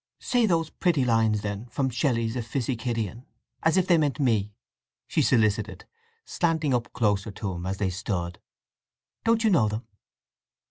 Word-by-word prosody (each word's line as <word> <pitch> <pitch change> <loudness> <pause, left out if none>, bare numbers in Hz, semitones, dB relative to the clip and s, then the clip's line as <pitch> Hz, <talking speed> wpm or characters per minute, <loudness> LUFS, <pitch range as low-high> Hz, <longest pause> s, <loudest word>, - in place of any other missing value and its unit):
"Say 245 -3 +2
those 165 -4 +1
pretty 160 -8 +1
lines, 110 -3 +2
then, 105 +3 -4
from 130 +2 -1
Shelley's 115 -2 0
'Epipsychidion' 120 -2 -2 0.4
as 160 +3 +3
if 185 - +3
they 175 -3 +4
meant 145 -2 0
me!" 110 -7 +1 0.5
she - - 0
solicited, 110 -4 +1 0.4
slanting 160 -5 0
up 120 -1 -1
closer 105 -4 0
to 100 -1 -4
him 90 0 -5
as 95 +1 -2
they 95 -2 0
stood. 90 -2 -3 0.8
"Don't 230 0 +2
you 220 - +4
know 140 - +4
them?" 110 +3 -4
120 Hz, 150 wpm, -26 LUFS, 105-150 Hz, 0.8 s, they